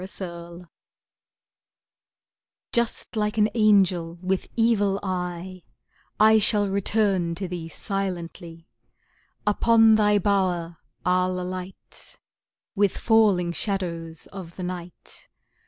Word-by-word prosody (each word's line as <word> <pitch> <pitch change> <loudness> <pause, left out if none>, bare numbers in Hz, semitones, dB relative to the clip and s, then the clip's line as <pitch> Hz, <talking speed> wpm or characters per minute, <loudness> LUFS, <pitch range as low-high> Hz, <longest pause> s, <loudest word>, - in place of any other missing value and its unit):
The 170 -3 -7
Ghost 180 - -17 2.1
Just 235 -1 0
like 210 0 -1
an 215 0 +3
angel 190 -6 +3
with 185 +1 -2
evil 205 -4 +2
eye, 180 -1 -4 0.6
I 220 +1 +6
shall 205 -1 +3
return 195 -3 0
to 190 +2 -4
thee 170 -2 -6
silently, 175 -3 -5 0.8
Upon 225 +1 +5
thy 210 -1 +4
bower 180 -4 0 0.3
I'll 180 0 +1
alight, 185 +1 -6 0.6
With 205 -2 +1
falling 205 -6 +3
shadows 170 -4 -3
of 180 -3 -9
the 185 - -6
night. 180 -1 -7
185 Hz, 100 wpm, -25 LUFS, 175-210 Hz, 2.1 s, I